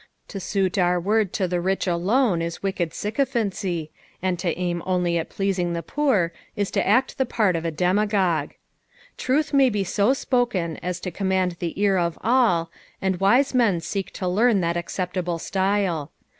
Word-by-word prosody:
To 195 Hz, -, -5 dB
suit 195 Hz, 0 st, 0 dB
our 180 Hz, 0 st, +3 dB
word 205 Hz, +2 st, +1 dB
to 190 Hz, -, 0 dB
the 175 Hz, 0 st, -1 dB
rich 190 Hz, +2 st, 0 dB
alone 185 Hz, +3 st, +2 dB
is 170 Hz, +2 st, -4 dB
wicked 190 Hz, -4 st, -1 dB
sycophancy, 205 Hz, -, -2 dB, 0.3 s
and 185 Hz, -1 st, -1 dB
to 175 Hz, -3 st, -1 dB
aim 175 Hz, -1 st, -2 dB
only 180 Hz, -2 st, +1 dB
at 165 Hz, -, -5 dB
pleasing 185 Hz, -3 st, -1 dB
the 170 Hz, 0 st, -3 dB
poor 205 Hz, -, +1 dB, 0.2 s
is 205 Hz, -1 st, -1 dB
to -, -, 0 dB
act 250 Hz, +7 st, +2 dB
the 265 Hz, -, +3 dB
part 210 Hz, -7 st, +1 dB
of 165 Hz, 0 st, -3 dB
a -, -, +1 dB
demagogue. 185 Hz, +1 st, +1 dB, 0.6 s
Truth 290 Hz, +4 st, 0 dB
may 275 Hz, -2 st, +5 dB
be 205 Hz, -3 st, -1 dB
ao 210 Hz, +6 st, +5 dB
spoken 240 Hz, -, 0 dB
as 180 Hz, 0 st, -4 dB
to 180 Hz, -, -4 dB
command 190 Hz, -2 st, 0 dB
the 170 Hz, +2 st, -4 dB
ear 200 Hz, -2 st, +3 dB
of 170 Hz, -1 st, -1 dB
all, 220 Hz, -9 st, +2 dB, 0.3 s
and 190 Hz, -2 st, -1 dB
wise 245 Hz, +9 st, +3 dB
men 230 Hz, -9 st, +3 dB
seek 190 Hz, +4 st, -4 dB
to 185 Hz, -, -3 dB
learn 210 Hz, +4 st, +3 dB
that 170 Hz, 0 st, 0 dB
acceptable 180 Hz, 0 st, -2 dB
st;le. 190 Hz, -4 st, 0 dB
190 Hz, 175 wpm, -24 LUFS, 175-210 Hz, 0.6 s, may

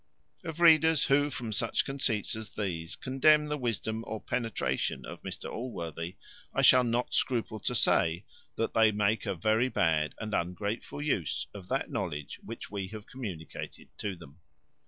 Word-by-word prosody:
Of 165 Hz, -1 st, -6 dB
readers 160 Hz, -3 st, +6 dB
who, 145 Hz, +1 st, +3 dB
from 120 Hz, -5 st, -4 dB
such 110 Hz, +2 st, +1 dB
conceits 130 Hz, -7 st, 0 dB
as 110 Hz, -1 st, -8 dB
these, 85 Hz, -5 st, -3 dB
condemn 150 Hz, +4 st, +4 dB
the 150 Hz, 0 st, -2 dB
wisdom 115 Hz, -2 st, -2 dB
or 110 Hz, 0 st, -3 dB
penetration 110 Hz, -, -1 dB
of -, -, -8 dB
Mr -, -, -6 dB
Allworthy, 85 Hz, -8 st, -5 dB, 0.4 s
I -, -, +2 dB
shall 125 Hz, 0 st, +8 dB
not 120 Hz, +1 st, 0 dB
scruple 115 Hz, -4 st, 0 dB
to -, -, -1 dB
say, 85 Hz, +4 st, +3 dB, 0.3 s
that 115 Hz, -, -1 dB
they 110 Hz, -1 st, +5 dB
make 105 Hz, +1 st, +1 dB
a -, -, 0 dB
very 110 Hz, +8 st, +2 dB
bad 80 Hz, -7 st, +1 dB
and 110 Hz, -1 st, -4 dB
ungrateful 100 Hz, +11 st, -2 dB
use 95 Hz, -, 0 dB
of 95 Hz, -3 st, -9 dB
that 135 Hz, -, -1 dB
knowledge 75 Hz, -7 st, -3 dB
which -, -, -8 dB
we 100 Hz, -2 st, -3 dB
have 105 Hz, +1 st, -9 dB
communicated 95 Hz, -, -7 dB
to 100 Hz, -2 st, -2 dB
them. 75 Hz, -2 st, -14 dB
110 Hz, 160 wpm, -30 LUFS, 90-130 Hz, 0.4 s, shall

